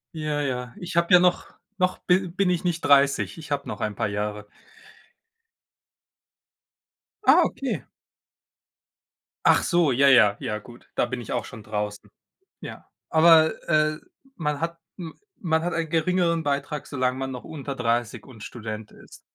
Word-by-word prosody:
Ja, 150 -1 -2
ja. 125 -3 -3
Ich 175 -1 -7
habe 170 +1 +2
ja 180 - +9
noch 180 0 +1 0.3
noch 185 0 +1
bi 185 +1 +2
bin 190 +1 0
ich 180 -1 0
nicht 170 -2 -1
30. 140 +2 +3
Ich 155 -2 -11
habe 140 0 -2
noch - - -6
ein 105 -2 -2
paar - - -1
Jahre. 105 0 -4 2.8
Ah, - - +7
okay. 225 - -3 1.6
Ach - - +5
so, 170 -5 +2
ja, 140 +3 +4
ja, 105 -6 +6
ja, 110 -5 -3
gut. 120 +3 -16
Da - - +2
bin 125 0 -5
ich - - -8
auch - - -2
schon 110 -4 -11
draußen. 105 0 -5 0.5
Ja, - - -9 0.2
aber, 160 0 +6 0.2
äh, 155 -1 +2 0.4
man 150 -3 -2
hat 170 0 -3 0.2
m 165 -3 -8 0.3
man 160 -3 0
hat 175 - -2
einen 165 -1 -2
geringeren 170 0 +1
Beitrag, 145 +1 -3
solange 130 -2 -1
man 135 0 -4
noch 125 -1 -7
unter 140 -3 -6
30 120 -1 -1
und 115 -5 -13
Student 110 -2 -7
ist. - - -16
145 Hz, 160 wpm, -24 LUFS, 120-170 Hz, 2.8 s, ja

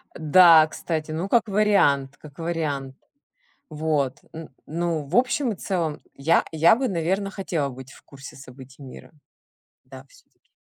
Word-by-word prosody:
Да, 160 0 +6
кстати, 155 0 -5
ну, 170 +5 -4
как 235 0 +2
вариант, 195 -10 +1
как 150 -2 -15
вариант. 150 -5 -4 0.7
Вот, 150 -4 -2
н 160 -1 -10 0.2
ну, 165 -1 -2
в 160 - -5
общем 255 +1 +1
и 210 - -4
целом, 170 -6 -3
я 160 +5 +1
я 165 +4 +4
бы, 260 +2 -2
наверное, 190 +3 -2
хотела 170 -8 -3
быть 130 +1 -11
в - - -18
курсе 140 0 -13
событий 130 +1 -14
мира. 130 - -12 0.7
Да, - - -13
всё-таки. - - -26
160 Hz, 145 wpm, -23 LUFS, 140-185 Hz, 0.7 s, Да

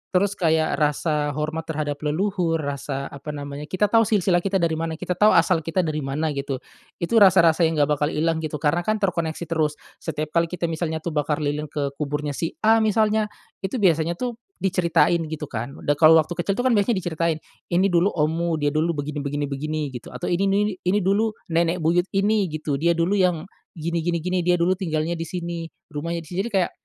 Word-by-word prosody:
terus 200 +2 +3
kayak 160 -5 +1
rasa 150 -1 0
hormat 155 +2 -3
terhadap 150 -2 -3
leluhur, 170 +2 0
rasa 140 -2 -4
apa 145 +2 -7
namanya 145 +1 -6
kita 205 +4 0
tau 225 -1 +5
silsilah 190 -4 +3
kita 195 +2 -2
dari 170 -3 +2
mana, 165 -1 -2
kita 160 - -5
tau 210 +4 +4
asal 165 +1 +4
kita 165 +3 -1
dari 155 -2 -2
mana 150 +3 -2
gitu. 140 -1 -3 0.4
Itu 225 +7 +2
rasa-rasa 170 -4 +6
yang 160 - -2
enggak 150 -1 +2
bakal 150 - +2
hilang 160 +1 0
gitu, 155 -1 -4
karena 150 +3 +1
kan 215 +5 0
terkoneksi 175 -6 -1
terus. 155 -2 0 0.2
Setiap 155 0 -4
kali 170 0 +2
kita 170 -1 -3
misalnya 160 -1 -3
tuh 170 - -2
bakar 150 0 -1
lilin 150 +1 -2
ke 140 -1 -3
kuburnya 150 0 -2
si 160 +3 -3
A 225 +1 +5
misalnya, 215 0 +2 0.3
itu 190 +5 -4
biasanya 170 -6 +2
tuh 240 +4 -4 0.2
diceritain 175 -2 +2
gitu 155 -2 -6
kan, 120 +4 -4
udah 145 0 +1
kalau 160 0 +8
waktu 155 0 +3
kecil 175 +3 -1
itu 245 - -1
kan 260 - +3
biasanya 215 +1 +3
diceritain, 170 -3 -1 0.3
"ini 185 +2 +2
dulu 175 +2 +4
ommu, 165 -1 0
dia 145 -2 0
dulu 160 +3 0
begini 145 0 -4
begini 145 +1 -2
begini" 155 +3 -3
gitu. 125 -2 -8
Atau 125 - -3
"ini 190 +3 +2
ini 200 -1 +1
ini 195 +2 +1
dulu 210 +3 +1 0.2
nenek 170 +1 +1
buyut 175 +3 +2
ini" 205 0 +2
gitu, 155 -3 -3
"dia 170 +2 +2
dulu 175 +5 +1
yang, 180 -4 +2 0.3
gini 170 +1 -2
gini 170 0 -1
gini. 180 +1 0
Dia 175 0 +3
dulu 175 +1 +2
tinggalnya 165 -1 -1
di 165 - -4
sini, 170 -2 -4 0.2
rumahnya 165 +3 -3
di - - -16
sini" 175 - -5
jadi - - -8
kayak, 185 -2 +2
165 Hz, 210 wpm, -23 LUFS, 150-180 Hz, 0.4 s, kalau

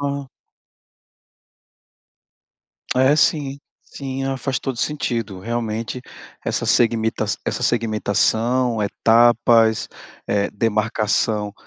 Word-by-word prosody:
Ah. 140 -1 -3 2.7
É, 130 +3 +4
sim, 145 -3 +1 0.3
sim. 135 -1 -6
Ah, 135 0 -1
faz 130 -1 -2
todo 135 - -4
sentido, 115 -8 -2
realmente 115 +3 -3 0.4
essa - - -1
segmita 115 -1 +2 0.2
essa - - -2
segmentação, 115 +1 +1
etapas, 115 +1 +3 0.4
eh, 100 -1 0
demarcação 105 -1 0
115 Hz, 80 wpm, -21 LUFS, 110-130 Hz, 2.7 s, É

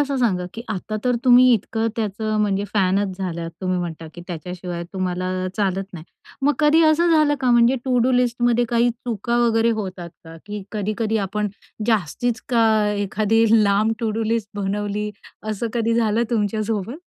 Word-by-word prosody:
असं 280 -1 0
सांगा? 195 -8 +1
की 230 - -6
आता 215 +1 -4
तर 250 -1 +2
तुम्ही 250 0 +7
इतकं 225 +2 -2
त्याचं 215 0 -2
म्हणजे 200 -1 0
फॅनच 190 -1 +1
झालात 170 -3 -4
तुम्ही 185 -1 -1
म्हणता 165 -2 -5
की 175 - -9
त्याच्याशिवाय 175 0 -6
तुम्हाला 185 -1 -2 0.3
चालत 195 -2 0
नाही. 165 -2 -9 0.4
मग 290 +2 +4
कधी 310 +2 +4
असं 330 +2 +4
झालं 305 -2 +4
का? 255 - +2
म्हणजे 240 +2 +4
तो 260 +1 -5
टू 250 - +3
डू - - +2
लिस्टमध्ये 240 -1 +2
काही 240 0 +2
चुका 235 0 -3
वगैरे 230 0 +3
होतात 180 -3 -6
का? 165 0 -11
की 205 -1 -5
कधी-कधी 215 +1 -1
आपण 210 +2 -2 0.4
जास्तीच 225 +3 0
का 230 -2 +3 0.3
एखादी 210 +2 +1 0.2
लांब 205 +3 +2
टू 225 -2 0
डू 225 +1 -2
लिस्ट 225 -2 -1
बनवली, 205 +1 -2 0.4
असं 215 +2 -2
कधी 230 0 +1
झालं 225 0 +2
तुमच्यासोबत? 215 +1 -1
215 Hz, 170 wpm, -21 LUFS, 195-235 Hz, 0.4 s, तुम्ही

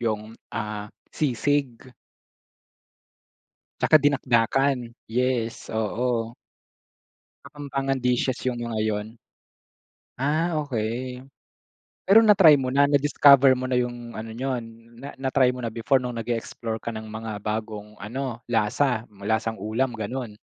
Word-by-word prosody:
yung, 110 -1 -2 0.2
ah, 105 -1 -4 0.2
sisig. 135 -2 -1 1.9
Tsaka 155 - +6
dinakdakan, 135 0 +2 0.3
yes, 120 -1 -1
oo. 115 +1 -1 1.1
Kapampangan 135 -2 -3
dishes 125 +1 0
yung 120 -1 -3
mga 115 -2 -3
'yon. 105 -1 -2 1.1
Ah, 155 +5 0
okay. 125 -2 -3 0.8
Pero 205 +3 +7
na-try 195 -9 +7
mo 130 - -2
na, 140 +3 +3
na-discover 140 -1 +5
mo 130 - -5
na 130 -1 +1
yung 120 -1 -4
ano 110 0 -7
niyo, 130 -1 -2 0.4
na 140 +3 -9
na-try 130 -1 +2
mo 125 - -7
na 115 - -2
before 125 +4 +1
no'ng 120 -2 -4
nag-e-explore 115 0 -4
ka 115 - -3
ng 110 -1 -7
mga 110 -1 -6
bagong 105 0 -5
ano, 120 +3 -5
lasa? 115 +2 +1
Hmm, 100 -1 -17
lasang-ulam, 110 +3 -1
gano'n? 110 +1 -5
120 Hz, 115 wpm, -25 LUFS, 110-135 Hz, 1.9 s, Pero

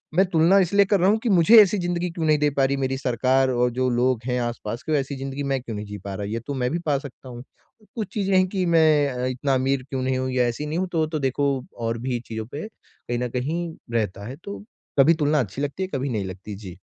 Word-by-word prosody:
मैं 190 +3 +5
तुलना 170 +3 +4
इसलिए 200 +2 +4
कर 200 -1 +2
रहा 185 - +4
हूँ 215 - +4
कि 240 - 0
मुझे 210 +4 +8
ऐसी 205 +1 +3
ज़िंदगी 175 0 -1
क्यों 165 -1 -3
नहीं 155 -1 +4
दे 150 0 +3
पा 135 - +4
रही 135 +1 +1
मेरी 135 -1 -1
सरकार 130 +1 +2
और 125 0 +2
जो 130 +1 0
लोग 125 0 +1
हैं, 125 -1 0
आस-पास 120 -1 -4
की - - -4
वैसी 140 -2 0
ज़िंदगी 135 +1 -4
मैं 135 -1 0
क्यों 115 -3 -6
नहीं 105 0 -5
जी 105 0 -7
पा 100 0 -7
रहा 100 +1 -4
है, 100 - -5
ये 115 - -2
तो 145 - -2
मैं 125 -2 -1
भी 170 - -1
पा 145 -3 +2
सकता 135 -2 -10
हूँ। 120 0 -8 0.5
कुछ 220 -4 -3
चीज़ें 195 -2 0
हैं 185 - +4
कि 185 -1 -1
मैं 155 -4 +4
अ, 125 -1 -3
इतना 130 +2 -1
अमीर 130 0 +1
क्यों 135 -1 -2
नहीं 130 0 0
हूँ 130 0 -2
या 125 -1 +2
ऐसी 120 +5 -3
नहीं 155 +2 -3
हूँ 185 - -1
तो 160 -2 +1
तो 155 0 -3
देखो 140 +1 +1 0.4
और 115 - -1
भी 125 -2 -1
चीज़ों 110 -1 -5
पे 150 +8 -5
कहीं 120 - -8
न 125 0 -2
कहीं 160 +7 -3 0.2
रहता 100 -3 -1
है, 130 - -6
तो 200 0 -7 0.4
कभी 150 +5 +7
तुलना 150 -1 +1
अच्छी 120 +2 -3
लगती 145 +6 -2
है, 185 - -4
कभी 135 0 -1
नहीं 105 -5 -2
लगती। 95 +2 -7
जी। 95 -3 -10
135 Hz, 270 wpm, -24 LUFS, 125-165 Hz, 0.5 s, मुझे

